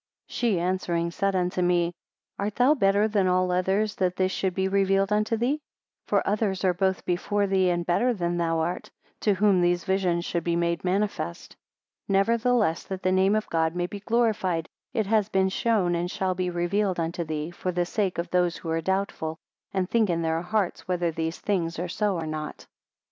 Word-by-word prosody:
48 - - -12
She 225 -7 +1
answering, 175 -1 -1
said 195 +2 0
unto 180 0 0
me, 175 -1 +2 0.5
Art 205 +1 -2
thou 255 +4 +5
better 200 -5 +3
than 205 -3 +1
all 185 0 +2
others 195 +4 +1
that 180 -1 +1
this 185 0 +1
should 190 -2 -1
be 190 0 +1
revealed 195 +1 +2
unto 215 +2 +1
thee? 265 +7 0 0.5
For - - +1
others 200 -2 0
are 185 -1 +3
both 190 +1 0
before 200 +3 0
thee 190 -2 +2
and 175 -1 0
better 235 +9 +2
than 175 -5 -1
thou 165 -1 +1
art, 175 +3 -3 0.3
to 205 -2 +2
whom 195 -2 +3
these 175 0 +2
visions 185 -3 0
should 170 -2 -2
be 170 0 0
made 170 0 0
manifest. 190 - -2 0.5
49 195 0 +3
Nevertheless, 230 -4 +2
that 190 -1 -6
the 185 - +2
name 190 +2 +3
of 215 - -1
God 160 0 +1
may 175 0 0
be 200 +3 -6
glorified, 205 -7 0 0.2
it 220 - 0
has 215 0 +2
been 190 -1 +2
shown 195 -3 +1
and 175 +1 -1
shall 185 0 -1
be 180 0 -2
revealed 180 +2 0
unto 170 +1 -2
thee, 155 0 -4
for 180 +1 -3
the 175 0 0
sake 195 0 -1
of 170 - -3
those 180 -1 +2
who 165 - -5
are 165 0 0
doubtful, 190 -3 -2 0.3
and 190 -2 -1
think 220 -1 +2
in 170 -1 0
their 160 0 0
hearts 195 0 -1
whether 175 -2 0
these 160 +1 -3
things 170 -5 -1
are 175 +2 -2
so 205 +2 0
or 165 -2 -3
not. 155 -1 -5
185 Hz, 200 wpm, -26 LUFS, 175-200 Hz, 0.5 s, thou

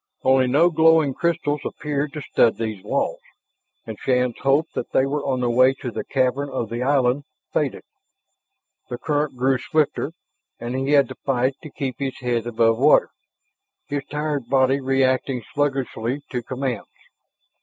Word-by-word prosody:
Only 130 0 +4
no 150 +7 +4
glowing 160 -3 +4
crystals 150 -2 -1
appeared 150 -1 -3
to 150 -2 -6
stud 115 - +2
these 110 -4 -4
walls, 140 - -1 0.7
and - - -7
Shann's 125 -2 0
hope 140 +4 +2
that - - -5
they 130 - +4
were 145 +1 -2
on 130 -2 -1
their 120 - +1
way 130 +2 +4
to 125 -2 -6
the - - -4
cavern 135 +1 0
of 120 -5 -4
the 120 +1 -3
island 135 0 +2 0.3
faded. - - -1 1.1
The 120 - -4
current 145 0 -1
grew 130 +1 +2
swifter, 155 +2 0 0.5
and 120 +2 -4
he 135 +2 0
had 140 -3 +5
to - - -7
fight 130 0 +1
to 155 - -9
keep 135 -3 -5
his 135 -2 -3
head 120 -2 -2
above 115 -1 +2
water, 145 +3 +5 0.7
his 145 0 -3
tired 150 -4 -3
body 135 0 +3
reacting 130 -1 +1
sluggishly 135 -2 -1
to 125 -2 -2
commands. 125 -1 -4
135 Hz, 160 wpm, -22 LUFS, 125-145 Hz, 1.1 s, had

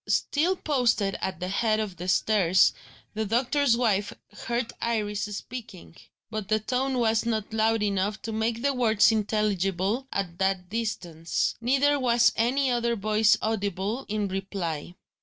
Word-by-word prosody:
Still 335 +6 +1
posted 245 - +1
at 190 -3 -3
the 180 - -3
head 215 +2 +1
of 205 -5 -4
the 180 +2 -6
stairs, 190 -2 +3 0.4
the 220 0 -2
doctor's 240 +3 +2
wife 205 -4 +1 0.2
heard 235 +3 -3
Iris 210 -3 -1
speaking; 210 -4 -8 0.4
but 215 -3 -4
the 215 0 +2
tone 255 +4 -1
was 225 -2 +2
not 220 -2 -2
loud 220 0 +2
enough 205 +1 -1
to 225 - -4
make 225 +2 -1
the 280 0 +2
words 225 -4 +4
intelligible 210 +1 0
at 180 -3 -3
that 190 -2 0
distance; 185 -8 -2
neither 275 +4 +2
was 240 -2 +3
any 255 +4 +1
other 235 -1 0
voice 215 +1 +3
audible 205 +2 -2
in 210 -1 -1
reply. 185 -4 -4
215 Hz, 145 wpm, -26 LUFS, 195-235 Hz, 0.4 s, words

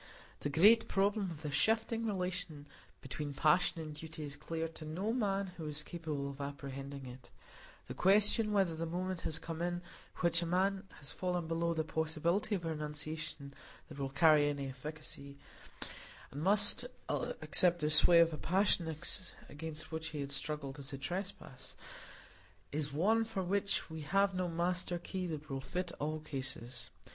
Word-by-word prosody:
The 145 - -2
great 210 +10 +6
problem 200 0 +2
of 160 -2 -8
the 150 - -2
shifting 225 +7 +2
relation 180 -6 -3 0.4
between 140 +2 -5
passion 165 +2 +3
and 155 -1 -6
duty 160 +1 -7
is 145 -1 -5
clear 165 +2 -3
to 160 - -10
no 180 +9 -2
man 200 -5 0
who 160 -2 -5
is 150 0 -3
capable 155 -5 -4
of 140 +1 -9
apprehending 140 -1 -6
it; 125 0 -10 0.6
the - - -5
question 210 +3 +5
whether 190 -5 +2
the 165 +1 -3
moment 180 +1 -2
has 160 - -2
come 165 0 -5
in 175 0 -1 0.4
which 170 -1 +3
a 170 - -1
man 190 +3 +1
has 140 -1 -8
fallen 180 -2 -1
below 165 +1 0
the 160 - +1
possibility 160 +6 0
of 175 -3 -4
a - - 0
renunciation 150 -1 -5 0.4
that - - -9
will 135 -1 -1
carry 150 0 +5
any 140 -1 -2
efficacy, 140 +1 -8 0.9
and 145 - -5
must 200 +3 +5 0.2
accept 175 -2 +2
the 150 0 +1
sway 170 +3 +7
of 165 -1 +6
a - - -3
passion 180 -3 +2 0.5
against 155 +1 -6
which 160 0 -3
he 155 -3 -4
had 140 0 -4
struggled 140 0 -4
as 140 +1 -8
a 135 - -4
trespass, 155 -2 -6 1.0
is 145 0 -1
one 210 +10 +3
for 220 -4 -3
which 200 +2 0
we 160 -1 -6
have 195 +6 +2
no 185 -1 0
master 175 +1 0
key 185 +1 -4
that 155 -2 -5
will 135 -2 -3
fit 180 +6 -3
all 155 +2 -1
cases. 130 -4 -5
160 Hz, 170 wpm, -35 LUFS, 150-185 Hz, 1.0 s, sway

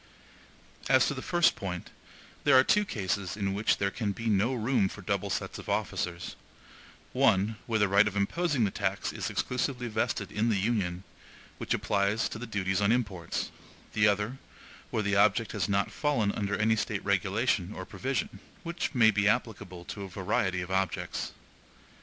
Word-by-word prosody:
As 130 -1 +6
to - - 0
the 130 - -5
first 175 +2 +3
point, 90 -3 -5 0.5
there 145 -3 +6
are 130 - +7
two 210 +8 +3
cases 100 - -2
in 100 -2 -1
which 105 +3 +2
there 100 0 0
can 105 -2 -2
be 115 - -7
no 105 +5 +2
room 115 -4 +1
for - - -10
double - - -1
sets - - -3
of - - -9
officers: 90 0 -2 0.8
one, 100 +4 +3
where 115 -2 +1
the 105 -1 +3
right 100 +2 +5
of 100 - -3
imposing 135 - +1
the 100 - +1
tax 100 -1 -2
is - - -3
exclusively 125 -1 -1
vested 105 -3 -1
in 110 +3 +1
the 110 - +2
Union, 95 -4 -1 0.6
which - - 0
applies 100 +2 +1
to 110 - -6
the 125 - -6
duties 95 -2 -1
on 100 +1 +3
imports; 105 -8 -1 0.4
the 110 0 +4
other, 105 +6 0 0.5
where 110 - -1
the 100 0 +1
object 105 +3 +3
has - - -1
not 100 0 +1
fallen 135 -9 +1
under 100 -1 -2
any 110 +2 +3
State 105 - -2
regulation - - +1
or - - -6
provision, - - -3 0.2
which 170 -3 -3
may 110 -3 +6
be 105 -1 +2
applicable 100 -6 -1
to 100 - -7
a 95 - -6
variety 95 -1 0
of 90 +1 -6
objects. 95 0 -1
105 Hz, 175 wpm, -29 LUFS, 100-115 Hz, 0.8 s, are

